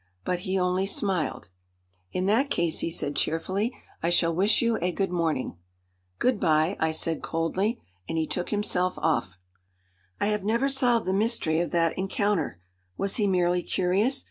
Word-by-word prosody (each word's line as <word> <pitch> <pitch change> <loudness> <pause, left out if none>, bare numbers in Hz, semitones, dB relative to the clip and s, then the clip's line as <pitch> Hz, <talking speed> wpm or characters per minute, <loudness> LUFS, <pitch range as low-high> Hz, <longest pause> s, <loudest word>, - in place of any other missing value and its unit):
But 180 -1 0
he 185 +1 -1
only 180 +1 +1
smiled. 190 - -1 0.6
"In 185 - -1
that 230 +8 +2
case," 170 - 0
he - - -1
said 145 -3 -3
cheerfully, 190 - 0 0.3
"I 165 - +1
shall 170 -1 +3
wish 200 +5 +3
you 230 -1 +1
a 180 +1 +1
good 190 0 -1
morning." 160 - -1 0.6
"Good 250 -4 +1
bye," 155 +4 +2
I 160 - +2
said 160 0 -1
coldly. 190 +8 -1 0.3
And 165 - -2
he 160 - +1
took 180 +2 -3
himself 185 -4 0
off. 120 - 0 0.8
I - - +1
have 210 -2 -1
never 235 +6 +1
solved 250 -4 +3
the 185 - 0
mystery 195 -6 +1
of 175 - 0
that 165 -2 +1
encounter. 190 - 0 0.4
Was 195 0 -1
he 210 -3 +2
merely 180 -1 +2
curious? 195 +10 +1
185 Hz, 170 wpm, -27 LUFS, 165-210 Hz, 0.8 s, shall